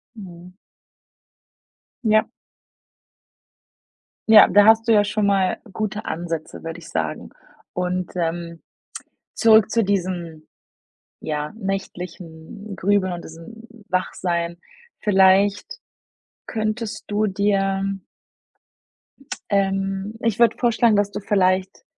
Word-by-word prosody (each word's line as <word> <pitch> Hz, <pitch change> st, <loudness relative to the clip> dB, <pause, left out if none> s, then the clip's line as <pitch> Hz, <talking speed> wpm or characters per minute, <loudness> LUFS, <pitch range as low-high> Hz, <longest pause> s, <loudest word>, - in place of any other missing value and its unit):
Mhm. 180 Hz, -3 st, -12 dB, 1.5 s
Ja. 215 Hz, -1 st, +3 dB, 2.0 s
Ja, 215 Hz, -2 st, +9 dB
da 205 Hz, +2 st, +6 dB
hast 225 Hz, +1 st, +5 dB
du -, -, +6 dB
ja 205 Hz, -2 st, +5 dB
schon 210 Hz, 0 st, -1 dB
mal 195 Hz, -2 st, +1 dB
gute 215 Hz, +1 st, -4 dB
Ansätze, 165 Hz, -1 st, -5 dB
würde 165 Hz, +1 st, -6 dB
ich 165 Hz, -, -13 dB
sagen. 80 Hz, -6 st, -3 dB, 0.4 s
Und, 180 Hz, 0 st, -3 dB
ähm, 170 Hz, -1 st, -3 dB, 0.7 s
zurück 220 Hz, -2 st, +5 dB
zu 230 Hz, -1 st, +2 dB
diesem, 175 Hz, -5 st, -3 dB, 0.7 s
ja, 150 Hz, -1 st, -4 dB
nächtlichen 190 Hz, -1 st, -7 dB
Grübeln 190 Hz, 0 st, +1 dB
und 175 Hz, -, -7 dB
diesem 165 Hz, +8 st, -12 dB, 0.2 s
Wachsein. 175 Hz, -2 st, -2 dB, 0.4 s
Vielleicht 195 Hz, 0 st, +3 dB, 0.7 s
könntest 215 Hz, 0 st, -4 dB
du 210 Hz, +1 st, 0 dB
dir 195 Hz, -1 st, 0 dB, 1.5 s
Ähm, 195 Hz, +1 st, -1 dB
ich 230 Hz, -2 st, -1 dB
würde 235 Hz, -1 st, +4 dB
vorschlagen, 235 Hz, -2 st, +2 dB
dass 205 Hz, 0 st, +1 dB
du -, -, -5 dB
vielleicht 190 Hz, -2 st, 0 dB
195 Hz, 100 wpm, -22 LUFS, 175-210 Hz, 2.0 s, Ja